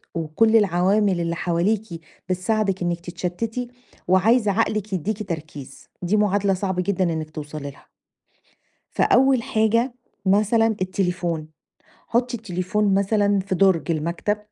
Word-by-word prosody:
وكل 170 +8 +2
العوامل 195 -1 +3
اللي 170 0 -1
حواليكِ 175 +2 -1 0.3
بتساعدِك 190 +1 0
إنِّك 175 0 -1
تتشتِّتي 180 +8 -4 0.4
وعايزة 210 +4 +4
عقلِك 215 -1 -1
يدّيكِ 200 +3 -3
تركيز، 150 -5 -7
دي 180 +4 0
معادلة 205 -1 +2
صعبة 190 -1 -1
جدًا 190 -1 0
إنِّك 155 -1 -4
توصلي 150 -1 -6
لها. - - -21 1.0
فأول 260 -1 +3
حاجة 230 +4 +1 0.3
مثلًا 215 +4 +3
التليفون، 180 -4 -1 0.6
حُطّي 245 +1 0
التليفون 200 0 -1
مثلًا 200 0 +2
في 190 0 -3
دُرج 185 -3 +2
المكتب 170 +6 -1
190 Hz, 115 wpm, -23 LUFS, 175-215 Hz, 1.0 s, وعايزة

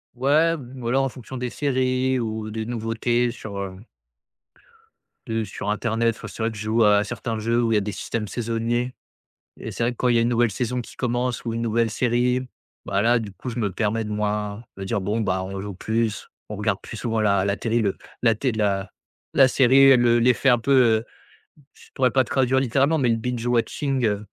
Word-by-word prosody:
Ouais, 155 +6 +3
mmh, 130 -1 -10
voilà, 120 +3 +1
en 135 - +1
fonction 130 +1 -9
des 125 0 -3
séries 130 -1 0
ou 110 -1 -4
des 110 0 -4
nouveautés 120 +1 0
sur 110 -4 -8
heu 95 0 -6 1.5
heu, 110 -1 -1
sur 105 +1 -5
internet, 115 +1 0
enfin - - -9
c'est - - -8
vrai 115 - 0
que 110 - -9
je 105 - -5
joue 110 +1 +2
à 105 0 +5
certains 115 0 -4
jeux 115 +2 +1
où 115 - +1
il - - +3
y - - +5
a - - +2
des 105 +1 -3
systèmes 105 +1 -4
saisonniers 120 +2 -2 0.7
et - - -6
c'est 115 - -3
vrai 120 - +1
que 120 - -11
quand 125 - +1
il 120 - +3
y - - +5
a - - +4
une 120 - +2
nouvelle 120 -1 +2
saison 125 +3 -2
qui - - -13
commence 125 -1 -2
ou 115 - -2
une 115 - -2
nouvelle 115 0 +1
série, 125 +2 +1 0.4
bah, 100 - 0
là 120 +1 +4
du 105 -3 -6
coup 125 - -7
je 120 0 -4
me 100 -3 0
permets 110 +2 -1
de 105 - -6
moi 105 +1 -2
de 95 - -5
dire: 100 +1 -1
«Bon 105 +4 -1
bah 95 -2 0
on 95 0 -5
joue 100 -1 -6
plus, 110 +1 -2 0.2
on 105 - -5
regarde 105 -1 -1
plus 115 - -8
souvent 115 -1 -1
la 100 -2 +2
la 100 0 +1
télé, 115 0 0
le 100 -3 0 0.3
la 115 -1 +5
té 130 +3 0
la 100 -2 0 0.5
la 135 -1 +7
série», 135 +1 +6
le 120 -1 +4
l'effet 125 +3 +3
un 120 - +5
peu, 140 +5 -2
heu, 115 -4 +4 0.7
je - - -19
pourrais 130 -2 +2
pas 130 -1 +3
traduire 130 +1 +1
littéralement, 140 +5 +2
mais 125 -3 +2
le 115 - +2
binge 120 0 -3
watching, 125 +2 0
heu, 105 0 -1
115 Hz, 225 wpm, -23 LUFS, 105-125 Hz, 1.5 s, la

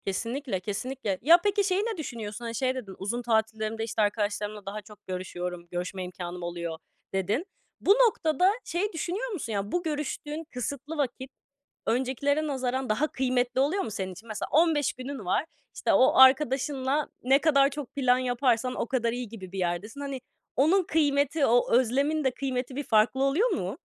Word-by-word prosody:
Kesinlikle, 230 +3 -2
kesinlikle. 210 +1 -3
Ya, 330 +7 +8
peki 410 0 +2
şeyi 380 0 +1
ne 450 -1 -2
düşünüyorsun? 235 -6 -6
Hani 230 0 -4
şey 255 +2 0
dedin, 205 -7 -7
"Uzun 220 +6 -3
tatillerimde, 220 -1 0
işte, 225 0 -1
arkadaşlarımla 210 0 -1
daha 205 +2 -5
çok 210 -1 -17
görüşüyorum, 180 -1 -5
görüşme 180 +2 -3
imkânım 180 -1 -6
oluyor." 170 -1 -4 0.4
dedin. 200 - 0 0.4
Bu - - +4
noktada 385 -6 +4
şeyi 375 +5 -1
düşünüyor 375 +9 -3
musun? 280 - -4
Yani 200 0 -2
bu 355 - 0
görüştüğün 300 0 -3
kısıtlı 280 +5 -4
vakit 260 -1 -2 0.5
öncekilere 270 +5 +1
nazaran 260 -2 -2
daha 250 +9 +2
kıymetli 255 -1 +1
oluyor 320 +9 +1
mu - - -5
senin 190 -2 -3
için? 215 +6 -14
Mesela 215 -2 -4
15 310 -3 +3
günün 255 -3 -7
var. 185 - +1 0.3
İşte, - - +1
o 260 - +5
arkadaşınla 265 +1 +4
ne 265 +3 +5
kadar 280 -3 +5
çok 285 -2 -7
plan 255 -3 +3
yaparsan 250 -1 +1
o - - -2
kadar 235 -2 0
iyi 245 -2 -4
gibi 190 -5 -9
bir 195 - -5
yerdesin. 185 +9 -2
Hani 275 -2 -4 0.3
onun 335 +9 +4
kıymeti, 285 -2 +2
o 245 0 +3
özlemin 275 +6 +2
de 265 - +2
kıymeti 255 -1 -3
bir 290 - -2
farklı 235 +3 +3
oluyor 315 - +3
mu? - - -2
255 Hz, 170 wpm, -28 LUFS, 215-290 Hz, 0.5 s, Ya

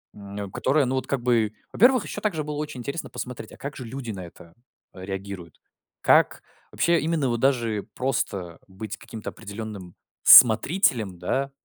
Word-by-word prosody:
м, 100 0 -7
которое, 140 +7 +1
ну, 130 +1 -1
вот 130 - -2
как 140 -3 -1
бы. 115 -3 +1 0.2
Во-первых, 250 +4 +4
ещё 210 - -6
также 175 -8 -1
было 150 0 -5
очень 150 -3 -5
интересно 140 +7 -5
посмотреть, 125 -1 -7
а - - -13
как 140 0 -7
же 130 - -7
люди 120 0 -6
на 95 -3 -7
это 85 0 -15 0.4
а 95 - -12
реагируют? 95 -4 -7 0.4
Как - - +4 0.3
вообще, 170 -1 +2
именно 155 -3 0
вот 120 -1 -1
даже 115 -6 +1
просто 100 -9 -2
быть 100 +2 -7
каким-то 110 -2 -8
определённым 105 -4 -8 0.3
смотрителем, 110 - +6
да. 135 +10 -1
115 Hz, 165 wpm, -25 LUFS, 100-140 Hz, 0.4 s, смотрителем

